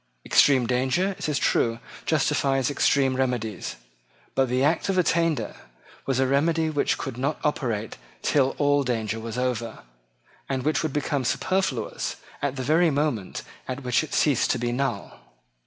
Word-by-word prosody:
Extreme 130 -4 +5
danger, 130 +10 +1
it - - -2
is 145 - 0
true, 115 -4 +2 0.3
justifies 140 -3 +1
extreme 135 -1 +2
remedies. 125 -6 -2 0.6
But 135 -2 +2
the 125 +2 +1
Act 160 +6 +1
of 190 - +1
Attainder 165 -3 +1 0.5
was 135 -1 +1
a 135 - +3
remedy 160 +4 +2
which 145 -2 +1
could 130 -3 -5
not 140 +4 -1
operate 115 -8 -1 0.3
till 135 -2 +2
all 145 0 +3
danger 115 -3 -2
was 115 +1 -6
over, 120 -3 -2 0.7
and 130 -2 -1
which 155 +3 +1
would 160 - -1
become 145 -1 -1
superfluous 150 +1 -1 0.3
at 140 -1 -1
the 130 - -3
very 160 +5 +4
moment 140 -9 -1 0.2
at 130 +2 -5
which 125 +3 +2
it 155 - -5
ceased 145 -6 +3
to - - +2
be 120 0 -1
null. 120 -4 -3
135 Hz, 155 wpm, -25 LUFS, 125-150 Hz, 0.7 s, Extreme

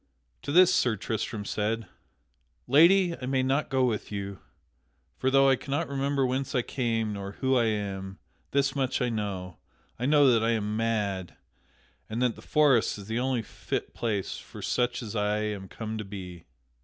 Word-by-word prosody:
To - - -4
this 180 +3 +6
Sir 120 -9 +2
Tristram 105 0 -3
said: 110 +2 -1 0.8
"Lady, 170 +6 +5
I 125 - -4
may 130 -1 +1
not 135 +3 0
go 130 -1 +2
with 110 -4 -2
you. 100 -1 -5 0.8
For 130 - +2
though 135 +1 +5
I 135 - +5
cannot 145 +5 -2
remember 140 0 0
whence 130 +2 -2
I 125 - +2
came, 115 -5 -1
nor 100 0 -6
who 130 +4 +1
I 120 -2 +3
am, 100 -3 -3 0.3
this 135 0 +1
much 130 -2 0
I 125 - +1
know 95 -6 -4 0.4
I 125 - 0
know 145 -2 +6
that 115 -2 +3
I 115 +1 +2
am 105 -1 -1
mad, 105 -6 -1 0.7
and 110 - -3
that 125 -3 +1
the - - -13
forest 140 -9 +3
is 100 - -9
the 110 +3 -2
only 130 -2 0
fit - - -5
place 105 -5 -2
for - - -11
such 120 0 0
as 110 -1 -6
I 105 0 +1
am 105 -3 -3
come 110 +2 -5
to - - -3
be." 95 -4 -9
115 Hz, 180 wpm, -28 LUFS, 105-135 Hz, 0.8 s, this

